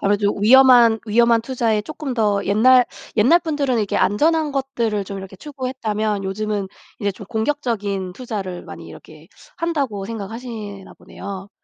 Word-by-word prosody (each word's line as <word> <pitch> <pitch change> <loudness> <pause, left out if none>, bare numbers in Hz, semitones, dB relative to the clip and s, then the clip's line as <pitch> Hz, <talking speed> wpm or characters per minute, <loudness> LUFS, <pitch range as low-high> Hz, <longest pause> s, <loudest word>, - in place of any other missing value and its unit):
아무래도 205 0 +1
위험한, 240 0 +7
위험한 235 +1 +4
투자에 230 -3 0
쪼끔 295 +2 -6
더 205 -4 +1
옛날, 250 +5 +5 0.3
옛날 250 +11 +5
분들은 290 -7 -1
이렇게 210 -2 -1
안전한 310 +8 +2
것들을 235 -7 -1
좀 195 +1 -7
이렇게 190 0 -10
추구했다면 220 -6 -3
요즘은 205 +1 -2 0.3
이제 200 -1 0
좀 205 - -11
공격적인 220 -6 -2
투자를 200 -7 -5
많이 - - -10
이렇게 - - -14 0.3
한다고 280 -12 -2
생각하시나 220 -2 -7
보네요. 195 0 -9
220 Hz, 360 characters per minute, -20 LUFS, 200-255 Hz, 0.3 s, 위험한